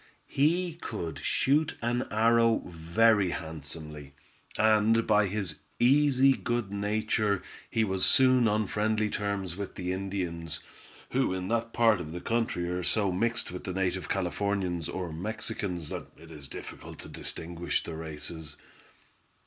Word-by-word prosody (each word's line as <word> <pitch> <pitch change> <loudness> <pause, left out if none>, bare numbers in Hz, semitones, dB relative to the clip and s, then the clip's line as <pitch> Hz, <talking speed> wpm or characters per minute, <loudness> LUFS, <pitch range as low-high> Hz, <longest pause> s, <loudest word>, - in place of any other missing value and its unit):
He 170 +4 +1
could 85 -8 -4
shoot 150 +3 +1
an 120 +2 -1
arrow 115 +1 +3
very 90 +5 +3
handsomely, 75 -3 -7 0.4
and 110 +1 +4
by 105 -1 +4
his 95 -6 -3 0.2
easy 135 +1 +5
good 120 -6 -2
nature 105 0 0 0.3
he 110 - +1
was 95 -3 0
soon 130 -2 +6
on 105 0 +2
friendly 110 +1 0
terms 100 -4 -2
with 100 0 -6
the 90 0 -3
Indians, 90 -4 -3 0.5
who 130 -7 +1
in 95 0 -4
that 115 0 0
part 115 -6 +4
of 80 -1 -7
the 90 - -4
country 115 -5 -1
are 90 +1 -2
so 100 +2 +1
mixed 115 +5 0
with 90 - -7
the 95 - -4
native 95 0 -1
Californians 95 -2 -1
or 90 -4 -4
Mexicans 90 -2 -4
that - - -5
it 80 0 -14
is 75 -4 -9
difficult - - -9
to - - -9
distinguish 85 +1 -3
the 85 - -6
races. 80 -1 -6
100 Hz, 140 wpm, -29 LUFS, 85-115 Hz, 0.5 s, soon